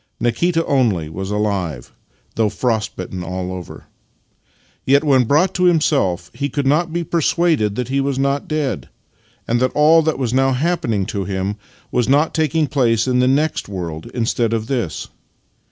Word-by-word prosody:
Nikita 165 +8 +1
only 110 - +1
was 95 +4 -5
alive, 100 - -2 0.4
though 110 -2 +1
frost 110 -3 -1
bitten 90 0 -6
all 90 +1 -4
over. 90 -2 -8 1.0
Yet, 140 +2 +3
when 135 -4 +4
brought 150 +10 +2
to 180 - +1
himself, 135 - +1
he 140 +4 -3
could 145 -1 -2
not 155 +5 +2
be 170 +1 -2
persuaded 165 - +1
that 125 0 -3
he 135 +1 +1
was 135 -1 -1
not 140 +1 0
dead, 145 - -2 0.6
and 120 +1 +1
that 130 +1 +1
all 155 +2 +6
that 160 -1 0
was 125 -3 -2
now 135 0 +3
happening 125 - 0
to 100 0 -3
him 95 +2 -2 0.4
was 125 0 +1
not 145 +4 +3
taking 160 0 +1
place 120 -5 +1
in 125 -1 +2
the 125 - +3
next 145 -2 0
world 85 -5 -5
instead 115 -1 0
of 115 -1 0
in - - +2
this. 105 -11 -3
125 Hz, 170 wpm, -19 LUFS, 100-150 Hz, 1.0 s, all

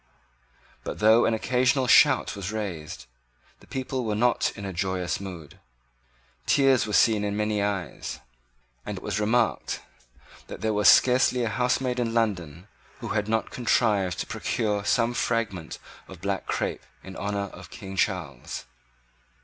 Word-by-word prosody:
But, - - -5
though 110 +2 +5
an 110 - +2
occasional 130 +3 +1
shout 130 0 +5
was 100 0 -5
raised, 95 -8 -5 0.5
the - - -20
people 130 -1 -3
were 110 -2 -1
not 120 +3 +2
in 100 - -7
a 95 - -5
joyous 90 0 -2
mood. 90 -6 -9 0.9
Tears 135 -5 +4
were 105 - -4
seen 110 -1 +4
in 105 0 -2
many 105 -1 0
eyes; 100 -6 -3 0.6
and - - -5
it - - -9
was - - -2
remarked 115 +2 0 0.7
that - - -9
there 110 -1 0
was 105 0 +5
scarcely 125 0 +5
a 115 - 0
housemaid 125 +2 0
in 115 -1 -1
London 90 -6 -1 0.3
who - - -6
had 105 0 -1
not 110 0 0
contrived 105 -7 +1
to - - -3
procure 105 -3 -2
some 115 +3 +2
fragment 110 -9 -2 0.3
of 95 - -11
black 100 0 -2
crepe - - -2 0.2
in 95 0 -10
honour 100 -1 -3
of 90 0 -11
King 95 -2 -9
Charles. 90 -11 -2
105 Hz, 150 wpm, -26 LUFS, 95-120 Hz, 0.9 s, though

